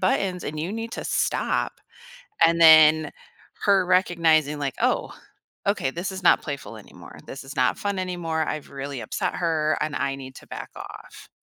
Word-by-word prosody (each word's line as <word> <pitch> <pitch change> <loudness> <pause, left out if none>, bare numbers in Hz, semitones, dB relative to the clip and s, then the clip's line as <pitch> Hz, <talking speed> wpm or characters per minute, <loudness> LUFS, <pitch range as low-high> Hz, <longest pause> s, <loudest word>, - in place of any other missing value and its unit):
buttons 185 -1 0
and 155 +1 -5
you 170 +5 -3
need 225 +1 -5
to - - -5
stop." - - 0 0.7
And 170 0 +1
then, 155 -1 +7 0.5
her 195 -2 +4
recognizing, 165 -5 +2
like, 140 -3 -2
"Oh, - - 0 0.5
okay, 200 -9 +1
this 175 +7 -4
is 190 - -7
not 180 - +5
playful 140 -2 -6
anymore, - - -14
this 135 - -8
is 135 - -10
not 125 0 +2
fun 200 -1 -2
anymore. 175 -4 -2
I've 155 - -4
really 140 -1 -6
upset 110 - -3
her, 155 -3 0
and 150 -1 -2
I 140 -1 -1
need 130 -1 -10
to - - -13
back - - -7
off." - - -11
160 Hz, 175 wpm, -24 LUFS, 145-185 Hz, 0.7 s, then